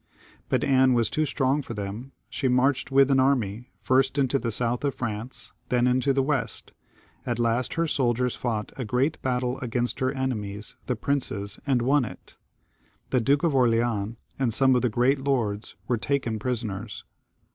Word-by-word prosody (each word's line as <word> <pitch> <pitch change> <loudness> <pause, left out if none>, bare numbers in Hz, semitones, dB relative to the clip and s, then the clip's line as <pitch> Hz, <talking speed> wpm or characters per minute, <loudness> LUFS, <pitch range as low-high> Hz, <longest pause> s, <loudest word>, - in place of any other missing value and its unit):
But - - +1
Anne 130 -1 +4
was 115 -2 +1
too 155 0 +1
strong 135 +1 +1
for 120 -4 -7
them; 105 +6 -5 0.2
she 135 - -2
marched 130 +2 +2
with 135 0 +4
an 135 - +4
army, 125 -4 +1
first 135 +2 +2
into 135 0 +2
the 115 - -2
south 120 +3 0
of 140 -2 0
France, 115 +1 -4 0.2
then 120 -1 +2
into 130 +2 +2
the 135 0 +2
west; 140 -2 -2 0.5
at 120 -2 -2
last 120 +1 0
her 165 - +1
soldiers 125 -4 +1
fought 110 -4 -3
a 130 - -2
great 125 +7 0
battle 125 0 -1
against 120 -1 -1
her 130 0 +1
enemies 110 -7 -4
the 125 - 0
princes, 110 -6 -2
and 125 -4 +2
won 140 +2 +3
it. 115 - -9 0.8
The 130 - +3
Duke 140 +5 +2
of 165 -4 +2
Orleans, 115 -4 +1 0.2
and 130 -4 +1
some 130 +3 +4
of 125 - +2
the 125 - +2
great 125 +5 +2
lords, 115 -7 -1
were 120 - +1
taken 120 -3 -1
prisoners. 110 -3 -4
125 Hz, 175 wpm, -26 LUFS, 115-135 Hz, 0.8 s, Anne